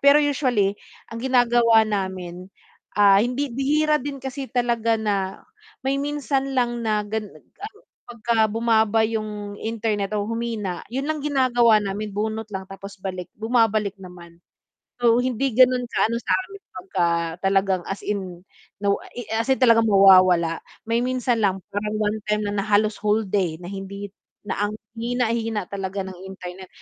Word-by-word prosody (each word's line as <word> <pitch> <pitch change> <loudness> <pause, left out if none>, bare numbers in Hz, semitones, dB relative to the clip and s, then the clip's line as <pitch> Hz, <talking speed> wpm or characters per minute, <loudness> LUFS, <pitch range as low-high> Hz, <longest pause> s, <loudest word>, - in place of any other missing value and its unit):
Pero 280 +1 +7
usually 255 -9 +1 0.4
ang 230 - -6
ginagawa 240 -3 +4
namin, 185 -3 -4 0.5
ah, 200 -1 +7
hindi 250 +4 -1
bihira 300 +4 +2
din 280 0 -5
kasi 265 0 -5
talaga 235 -2 +1
na 200 -3 -2 0.4
may 270 +1 +1
minsan 275 -2 -2
lang 240 -1 +1
na 210 -1 0
gan 210 0 -3
ano, 415 - -12 0.3
pagka 230 -2 +1
bumaba 225 -1 +2
yung 210 -2 -4
internet 215 -3 -2
o 205 - -1
humina 225 -6 -3
yun 270 +2 -2
lang 310 -1 -1
ginagawa 250 -5 +4
namin 205 +1 -3
bunot 220 +1 -2
lang 190 -1 -4
tapos 195 +1 -10
balik, 185 -2 -4
bumabalik 220 -3 +2
naman. 175 -2 -13 0.6
So 235 -1 +4
hindi 255 +1 0
ganon 255 -1 +5
ka - - +1
ano 230 - -1
sa'min 390 +8 -2
pagka 185 -1 -1 0.4
talagang 195 -1 +2
as 195 - -4
in, 185 -4 -4 0.4
no, 200 0 +2 0.2
i 245 - -5
as 225 +2 -1
in - - +2
talagang 230 -3 +5
mawawala. 185 -4 +6 0.3
May 230 +1 +2
minsan 250 -2 0
lang 195 -1 +1
parang 210 +1 -2
one-time 210 0 -1
na 205 0 -1
na - - -6
halos 210 +1 +2
whole 210 +1 +1
day 185 -5 0
na 175 - -6
hindi 200 0 -7 0.3
na - - -3
ang 210 - -6 0.2
hina 240 0 0
hina 225 -3 -2
talaga 195 0 -3
ng 185 -2 -9
internet 185 0 -9
220 Hz, 155 wpm, -23 LUFS, 195-245 Hz, 0.6 s, Pero